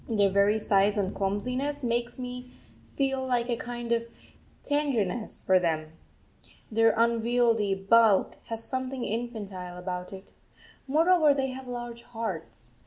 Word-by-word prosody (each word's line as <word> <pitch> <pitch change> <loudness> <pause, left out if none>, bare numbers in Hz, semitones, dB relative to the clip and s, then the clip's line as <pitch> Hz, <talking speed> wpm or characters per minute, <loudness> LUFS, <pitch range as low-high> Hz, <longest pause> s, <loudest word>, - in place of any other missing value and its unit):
Their 205 -3 +3
very 200 +2 +3
size 205 -1 +2
and 195 -2 0
clumsiness 250 +9 -2
make 240 0 -1
me 250 0 -6 0.5
feel 270 -1 0
a 240 0 +1
kind 240 0 -5
of 230 0 +1 0.6
tenderness 245 -8 -1
for 185 -1 +3
them 155 -3 -1 0.8
their 225 +1 +4
unwieldy 230 -2 +2
bulk 205 +1 +4
has 225 0 -5
something 260 0 -3
infantile 205 -6 -4
about 180 0 -5
it. 195 0 -11 0.5
Moreover, 315 0 +4
they 270 -1 0
have 260 0 -7
large 240 -1 -6
hearts. 230 -2 -5
230 Hz, 125 wpm, -28 LUFS, 200-250 Hz, 0.8 s, their